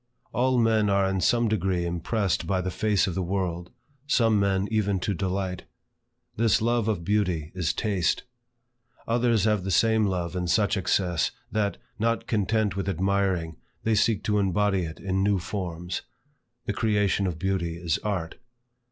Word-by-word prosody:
All 130 +1 +2
men 110 -3 +3
are 100 -1 +3
in 95 -1 -1
some 120 +6 +3
degree 95 -5 0
impressed 90 +3 -1
by 95 -2 +1
the 90 0 -2
face 105 0 +1
of 95 - -2
the 95 - -1
world; 90 -2 -2 0.4
some 115 -7 +3
men 100 0 +1
even 100 -3 +1
to 100 - -1
delight. 95 -1 -3 0.7
This 115 -1 +3
love 115 0 +1
of 100 -6 -1
beauty 90 -7 0
is 90 -5 0
Taste. 100 -7 0 0.8
Others 115 -3 +2
have 105 -3 +2
the 95 - -3
same 110 +2 +3
love 90 -2 -2
in 90 -1 -2
such 100 +4 +2
excess, 90 -2 +1 0.2
that, 105 -2 0 0.2
not 115 +1 0
content 105 -1 0
with 100 0 -2
admiring, 95 -3 0 0.3
they 110 - +2
seek 105 0 +2
to 105 -1 +1
embody 95 -1 +1
it 80 0 -8
in 95 0 -1
new 100 0 +2
forms. 90 -2 -4 0.6
The 105 - -1
creation 105 -3 +1
of 85 -3 -3
beauty 85 -2 -1
is 85 -2 -1
Art. 95 -6 -3
100 Hz, 160 wpm, -26 LUFS, 90-105 Hz, 0.8 s, men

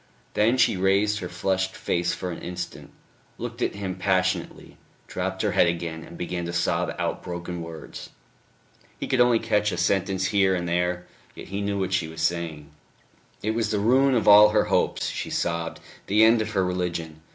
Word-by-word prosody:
Then 115 +4 +3
she 105 - +3
raised 100 +3 +2
her 90 -3 -5
flushed 95 +1 -1
face 85 0 -1
for 90 - -4
an 85 - -7
instant, 90 0 -6 0.5
looked - - -6
at - - 0
him 100 -2 -4
passionately, 95 -1 -1 0.3
dropped 95 +2 -3
her 105 - +1
head 85 - +4
again 85 -1 -3
and 85 - -11
began 90 0 -3
to 85 - -5
sob - - 0
out - - -2
broken 85 0 -5
words. 80 -1 -9 0.9
He - - -3
could 130 -2 +2
only 120 -1 +5
catch 105 -2 +1
a 90 - -3
sentence 95 +1 +1
here 95 -2 +3
and 85 -1 -3
there, 90 +1 -1 0.3
yet - - -10
he 100 +2 -3
knew 100 0 -1
what 95 0 -2
she 90 -3 +1
was 80 0 -7
saying.... 80 -3 -2 0.7
It 110 - +1
was 110 -1 -1
the 105 - 0
ruin 130 +6 +3
of 115 - 0
all 105 +1 +9
her 105 0 +3
hopes, - - +1
she - - -4
sobbed, 85 -1 -2 0.3
the 105 +2 +4
end 110 0 +5
of 110 +1 -4
her 95 -2 +2
religion. 85 -3 -3
95 Hz, 190 wpm, -25 LUFS, 85-105 Hz, 0.9 s, all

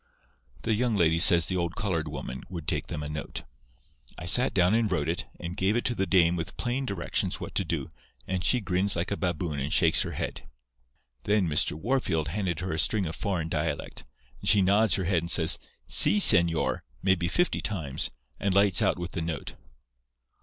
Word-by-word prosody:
"The 115 - 0
young 115 +1 0
lady 85 -3 +2
says 85 -2 +6
the 95 - -2
old 85 -1 -3
coloured 85 -7 -2
woman 65 -3 -7
would 85 -4 -8
take - - -2
them 75 - -6
a - - -5
note. 75 -1 -6 0.7
I - - -8
sat 125 +9 +2
down 90 +1 +2
and 115 -2 +1
wrote 75 -4 -1
it, 85 +2 -3
and 85 0 -6
gave 95 +3 0
it 120 - -2
to 120 - +1
the 95 -4 -2
dame 90 -2 +3
with 85 -1 -5
plain 130 +2 -3
directions 100 -5 -2
what - - -8
to - - -1
do, - - -4 0.4
and 95 -1 -3
she 125 +6 +3
grins 95 0 -1
like 85 +3 -3
a - - 0
baboon 85 -5 -3
and 70 +3 -4
shakes - - +4
her - - -3
head. - - -6 0.8
"Then 105 -3 +1
Mr. 75 0 0
Wahrfield 90 - -1
handed 90 -2 -3
her 90 -1 -4
a 80 - -2
string 100 +5 +1
of 80 0 -5
foreign 90 -3 -3
dialect, 75 -2 -4 0.4
and - - 0
she 100 -2 +5
nods 100 +3 +3
her 95 - -2
head 90 -2 +1
and 85 - -5
says, - - +5 0.3
'See, 80 +11 +7
señor,' 85 -4 +5 0.2
maybe 95 -3 +1
fifty 175 - 0
times, 80 -10 -3 0.3
and 100 -1 -1
lights 100 -2 +3
out 95 -3 +1
with 90 0 -6
the 80 - -4
note. 80 -4 -5
90 Hz, 205 wpm, -26 LUFS, 80-100 Hz, 0.8 s, See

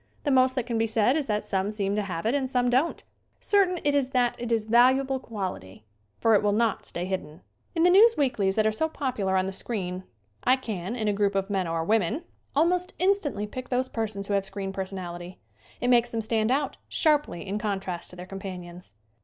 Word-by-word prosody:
The 290 - +1
most 260 0 +4
that 255 -4 -1
can 235 -2 -1
be 225 - +2
said 220 +4 +2
is 305 -3 -1
that 210 -1 -1
some 195 0 -1
seem 200 -2 -1
to 210 - +1
have 185 -3 -4
it 230 - +2
and 270 -2 0
some 245 -1 +1
don't. 270 +7 +1 0.4
Certain 380 -3 +2
it 290 -1 +2
is 280 -3 +1
that 245 -2 +1
it 240 0 -4
is 225 -2 +1
valuable 260 +4 +4
quality, 185 - -6 0.3
for 225 - +4
it 205 - +5
will 205 -1 +2
not 225 0 0
stay 175 - -4
hidden. 175 -5 -5 0.3
In 330 - +2
the 355 - +6
news 450 +5 +7
weeklies 220 -9 +1
that 215 - +2
are 220 - +3
so 320 +9 -1
popular 230 -11 -1
on 185 - +1
the 190 - -3
screen 185 -3 -4 0.4
I 255 - +5
can, 215 -5 -5
in 220 -3 -2
a 205 - +2
group 200 -1 +1
of 195 +1 -1
men 190 -3 0
or 165 0 -1
women, 205 -1 +2
88 - - -1
SCREEN 325 - -7
ACTING - - -37
almost 355 +4 +2
instantly 360 - +1
pick 255 +4 -7
those 255 0 0
persons 215 -3 -3
who 205 - -2
have 200 -1 +2
screen 195 0 -4
personality. 185 -2 -6 0.4
It 245 - 0
makes 240 -1 +4
them 225 -1 -2
stand 220 0 +1
out 275 +1 0
sharply 295 - +1
in 200 +2 -2
contrast 195 -5 -3
to - - -10
their 180 0 -8
companions. 180 - -8
220 Hz, 230 wpm, -26 LUFS, 195-260 Hz, 0.4 s, news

